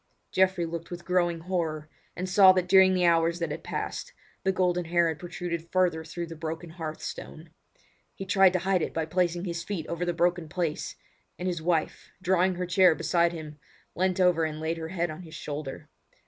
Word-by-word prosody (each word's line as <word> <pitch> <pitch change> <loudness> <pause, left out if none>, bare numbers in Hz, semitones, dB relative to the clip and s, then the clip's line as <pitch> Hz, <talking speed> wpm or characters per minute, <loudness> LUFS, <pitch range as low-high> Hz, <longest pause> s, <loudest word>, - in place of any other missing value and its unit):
Geoffrey 190 -2 +2
looked 165 0 -6
with 175 0 -8
growing 175 -2 +1
horror, 160 -4 -2 0.3
and 185 +2 -3
saw 190 0 +7
that 185 -1 0
during 190 0 +6
the 180 -1 +2
hours 170 0 +3
that 170 -3 -3
had - - -5
passed - - -4 0.3
the 190 - +2
golden 180 -2 +1
hair 170 0 +3
had 160 - -4
protruded 170 -1 -5
further 180 -4 +2
through 165 +2 -5
the 165 0 -9
broken 160 +1 -5
hearth 160 -2 -6
stone. 155 0 -8 0.6
He 195 - -6
tried 190 -1 +5
to 185 - +2
hide 190 -2 +2
it - - -3
by 160 -1 0
placing 175 +2 0
his 170 -2 -3
feet 185 -6 -4
over 170 +2 -3
the 175 - 0
broken 175 -1 0
place; 165 -2 -2 0.4
and 180 - -3
his 175 -3 -2
wife, 165 -1 -1
drawing 185 0 +2
her 180 +1 -2
chair 180 -1 +5
beside 170 0 +2
him, 155 -3 -8 0.3
leant 185 +1 0
over 180 -3 +4
and 155 -1 -2
laid 160 +1 -2
her 160 - -4
head 175 -2 -1
on 155 +3 -8
his 160 -3 -11
shoulder. 145 -2 -6
175 Hz, 205 wpm, -28 LUFS, 165-180 Hz, 0.6 s, saw